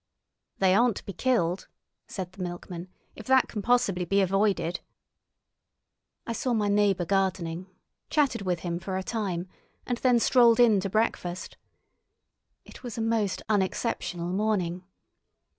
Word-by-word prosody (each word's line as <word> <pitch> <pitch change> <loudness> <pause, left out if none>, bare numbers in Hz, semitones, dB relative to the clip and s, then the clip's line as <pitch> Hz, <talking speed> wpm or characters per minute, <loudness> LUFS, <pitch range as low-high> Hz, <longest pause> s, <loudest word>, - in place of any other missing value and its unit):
"They 190 -1 +4
aren't 235 +1 +4
to - - -9
be 195 - -6
killed," 180 -5 0 0.4
said 185 -2 -6
the 185 - -11
milkman, 175 0 -6 0.3
"if 215 - -11
that 260 0 +5
can 210 - -5
possibly 200 -6 +2
be 195 +3 +1
avoided." 190 -3 +1 1.5
I 230 - -3
saw 240 +2 -1
my 210 -3 +1
neighbour 200 -3 +2
gardening, 185 -2 -1 0.4
chatted 290 -8 +1
with 180 -4 -1
him 170 -1 -3
for 190 +1 -4
a 190 - -3
time, 190 -5 -3 0.4
and 245 -1 -2
then 250 -2 +4
strolled 235 -1 +5
in 225 -4 +6
to 195 +1 -3
breakfast. 185 -4 -1 1.1
It - - -13
was 245 -3 -7
a - - -1
most 225 -3 0
unexceptional 190 -4 -1
morning. 185 -3 -1
195 Hz, 140 wpm, -27 LUFS, 180-225 Hz, 1.5 s, in